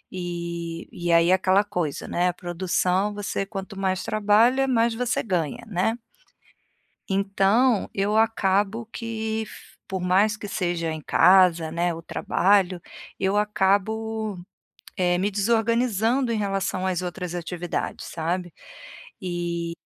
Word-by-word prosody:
e 170 -1 -5
e 175 0 -2
aí 170 +1 +5
é - - +6
aquela 190 +2 +3
coisa, 180 -8 -3
né. 180 0 +1
Produção 185 +2 0
você, 205 -1 -3
quanto 195 0 -7
mais 190 -1 0
trabalha, 225 +5 +3
mais 235 -2 +2
você 250 +1 -1
ganha, 175 - -2
né. 210 +3 0 1.1
Então 200 +4 +2
eu 205 +2 0
acabo 210 0 +1
que, 225 -1 -4
f - - -14
por 190 -1 -3
mais 195 +4 +2
que 205 - -7
seja 175 -4 -2
em 155 - -5
casa, 180 -1 +5
né, 170 +1 0
o 165 - -7
trabalho, 185 +1 +1 0.4
eu 190 +2 +1
acabo, 210 +1 0 0.6
eh, 175 -1 +2
me 200 +3 0
desorganizando 230 +3 +1
em 230 - 0
relação 195 -2 -1
às 185 -2 0
outras 180 -1 -5
atividades, 175 0 -4
sabe, 175 +1 -3 0.7
e 175 -2 -3
195 Hz, 125 wpm, -24 LUFS, 175-215 Hz, 1.1 s, é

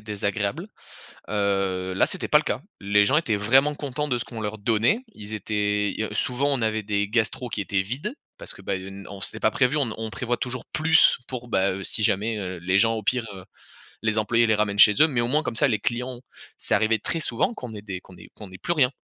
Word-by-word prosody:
désagréables. 105 - -3 0.6
Heu, 95 -3 0
là - - +3
c'était - - -3
pas - - +5
le - - -2
cas. - - -2 0.2
Les 100 +1 +3
gens 140 - +3
étaient 115 -10 +1
vraiment 135 +8 +3
contents 150 +1 -3
de 125 -2 0
ce - - -5
qu'on 115 -2 -8
leur 105 0 -4
donnait, 115 - +2
ils 105 +1 -9
étaient 105 -1 0
i - - -3
heu, - - -2
souvent 130 +3 +2
on 130 - +1
avait 110 -1 0
des 100 0 0
gastros 115 +2 -1
qui 105 - -3
étaient 95 -1 0
vides. 135 - -4 0.3
Parce - - -5
que, 95 - -14
bah, 95 - -2
i 95 - -4
heu, 95 - -8
n 95 0 -10
on 100 -1 -9
c'était - - -5
pas 110 - +1
prévu, 130 +3 +2
on 130 -7 +1
on 110 0 -5
prévoit 120 +4 -2
toujours 125 -1 -4
plus, 160 +1 +5
pour, 125 -2 -6
bah, 95 -4 +1
heu, 100 0 -6
si 110 - -1
jamais, 105 +3 +1
heu, 95 -2 -4
les 95 +3 +1
gens 115 0 +3
au 110 - -4
pire, 125 0 +1
heu 95 - -10 0.6
les 110 0 +1
employés 115 +1 +3
les 110 - +4
ramènent 105 -1 0
chez 105 - +8
eux. 155 - +8
Mais 130 -6 0
au 120 - 0
moins 150 +4 +2
comme 115 - -3
ça 140 - +4
les 105 -3 +1
clients 125 +3 -3 0.4
c'est - - -1
arrivé 110 +1 +3
très 165 +10 -2
souvent 125 - 0
qu'on 125 - -8
ait 105 -1 -8
des 95 -3 -6
qu'on 95 -1 -16
ait - - -14
qu'on 105 -3 -11
ait 95 - -11
plus 170 - -2
rien. 135 -6 +3
110 Hz, 255 wpm, -24 LUFS, 100-125 Hz, 0.6 s, chez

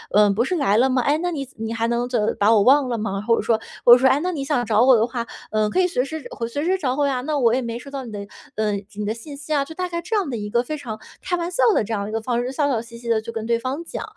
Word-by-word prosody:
嗯， 210 -1 +5
不 230 +5 +1
是 365 - -1
来 215 - +2
了 260 +3 +4
吗？ 255 -1 +2
哎， 285 +5 +2
那 355 0 -1
你 280 -5 -4
你 225 0 -4
还 230 0 0
能 235 +1 0
怎 230 -4 0
把 210 +2 +5
我 215 - +5
忘 270 +5 +5
了 235 - -1
吗？ 195 -2 -3
“或 230 - +5
者 - - -1
说 225 -2 +1 0.2
或 240 - +9
者 - - +9
说：” 260 +1 +3
哎， 265 +2 +3
那 365 +2 -1
你 295 -6 -3
想 275 -3 0
找 220 0 +3
我 260 -1 +7
的 225 0 +2
话， 235 -1 -4 0.3
嗯， 215 -1 +1
可 - - +1
以 360 - +3
随 335 -8 0
时 315 +1 -6
会 230 - -4
随 285 +5 -3
时 375 +2 +2
找 260 -8 -1
我 285 0 +1
呀， 260 -2 -1
那 300 +3 -2
我 235 -3 +3
也 260 - 0
没 235 -1 -4
收 275 - -11
到 275 -1 -5
你 230 - -8
的， 205 - -6 0.4
嗯， 210 -2 -1
你 210 0 -3
的 210 - -1
信 235 +6 -10
息 290 +2 -5
啊。 285 -2 +2
“就 320 - -9
大 365 +1 -2
概 340 -1 -3
这 400 +6 -3
样 395 -8 0
的 240 - -3
一 210 -1 -5
个 235 +3 +2
非 305 +5 -5
常 220 -6 -7 0.2
开 355 - 0
玩 340 0 -2
笑 260 - +1
的 - - +2
这 220 +2 -4
样 200 -2 -1
的 205 - -5
一 - - -6
个 225 - -1
方 240 +1 -1
式， 250 - -3
笑 285 +2 0
笑 240 -5 0
嘻 235 0 -12
嘻 235 0 -7
地 225 -1 +2
去 230 +1 -7
跟 225 -1 -5
对 235 0 +2
方 260 +7 -4
讲。 - - -6
245 Hz, 375 characters per minute, -22 LUFS, 225-285 Hz, 0.4 s, 或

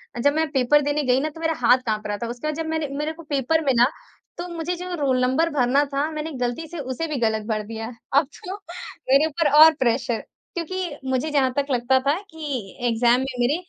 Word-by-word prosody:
अ, - - -5
जब 285 +4 +3
मैं 320 +1 +1
पेपर 285 +1 +3
देने 290 +1 0
गई 255 0 +3
ना 305 +3 -1
तो 320 +2 -13
मेरा 325 0 +1
हाथ 250 +2 +7
काँप 215 -2 -2
रहा 205 0 -2
था। - - -2
उसके 245 +5 -5
बाद 305 - -1
जब 325 0 -3
मैंने 320 -2 -1
मेरे 300 +2 -2
को 335 +1 -12
पेपर 300 +2 0
मिला, 245 -3 +5 0.5
तो 350 - -5
मुझे 335 +2 -2
जो 360 +1 -6
रोल 270 -5 +1
नंबर 275 +7 +2
भरना 270 +1 +3
था, 280 +2 -1
मैंने 310 +1 -4
गलती 245 +6 -2
से 340 +1 -7
उसे 265 +4 -3
भी 300 -3 -3
गलत 220 -2 0
भर 215 -2 -1
दिया। 225 0 -6 0.3
अब 280 +1 +4 0.2
तो 380 +2 -4 0.5
मेरे 275 +3 +5
ऊपर 315 -1 +1
और 320 0 +8
प्रेशर 235 -2 +1 0.4
क्योंकि 345 -2 -3
मुझे 260 +4 0
जहाँ 270 -3 +2
तक 280 - +2
लगता 255 +1 +3
था 285 - +5 0.2
कि 280 -11 -5
एग्ज़ाम 235 +1 +3
में 265 - -1
मेरे 250 +5 +2
285 Hz, 230 wpm, -23 LUFS, 245-315 Hz, 0.5 s, और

